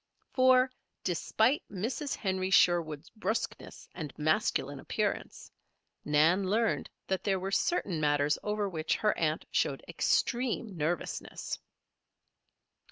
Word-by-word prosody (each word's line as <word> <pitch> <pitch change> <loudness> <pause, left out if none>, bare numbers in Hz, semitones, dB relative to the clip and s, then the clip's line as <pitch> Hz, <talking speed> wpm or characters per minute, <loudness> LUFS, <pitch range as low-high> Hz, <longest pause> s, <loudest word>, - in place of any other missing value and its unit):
For, 255 0 +5 0.3
despite 220 - +2
Mrs. 235 +8 -2
Henry 190 -2 -1
Sherwood's 165 -5 +3
bruskness 215 0 -4
and 155 -5 -5
masculine 155 +1 0
appearance, - - -3 0.5
Nan 165 +6 +3
learned 225 +2 +1 0.2
that 190 -1 -2
there 195 -2 +1
were 190 +1 -3
certain 195 - 0
matters 145 0 +2
over 210 -1 -1
which 160 -4 -1
her 210 -1 +1
aunt 155 -1 0
showed - - 0
extreme 240 -4 0
nervousness. 160 +1 -3
190 Hz, 105 wpm, -31 LUFS, 160-220 Hz, 0.5 s, For